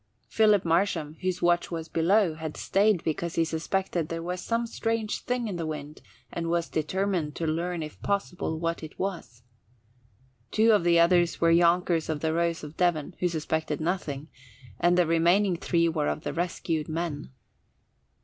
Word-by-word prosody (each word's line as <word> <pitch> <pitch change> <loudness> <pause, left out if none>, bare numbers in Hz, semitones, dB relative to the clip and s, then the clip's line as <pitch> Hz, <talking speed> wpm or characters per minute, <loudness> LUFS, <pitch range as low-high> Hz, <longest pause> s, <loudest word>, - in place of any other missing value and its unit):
Philip 210 -4 +4
Marsham, 165 -3 +1
whose 185 -1 -2
watch 175 0 +2
was 165 -2 -5
below, 170 +3 +2
had 155 -1 -6
stayed 200 -2 +2
because 165 +1 -2
he 165 - +2
suspected 170 0 -2
there 165 0 -4
was 180 +1 -3
some 230 0 -1
strange 225 -1 -2
thing 245 -2 -1
in 190 -4 -4
the 165 - -3
wind 150 -1 -6 0.3
and 165 -1 -3
was 170 0 0
determined 170 -1 -1
to 165 - -3
learn 170 +1 -1
if 155 - -9
possible 185 -5 -2
what 165 0 -2
it 155 -1 -9
was. 165 - -5 1.1
Two 225 - +4
of 210 -5 +4
the 170 -1 +4
others 175 0 +3
were 165 0 +4
younkers 170 -1 +3
of 155 -2 -2
the 160 0 0
Rose 170 -1 0
of 150 +1 -8
Devon, 175 -2 +1
who 180 - +2
suspected 160 -2 -2
nothing, 155 -4 -2 0.5
and 175 +1 +3
the 180 - +4
remaining 175 +4 +3
three 170 -1 +1
were 160 -3 0
of - - -2
the - - -3
rescued 165 -2 -2
men. 160 -2 -3
170 Hz, 170 wpm, -27 LUFS, 160-180 Hz, 1.1 s, Philip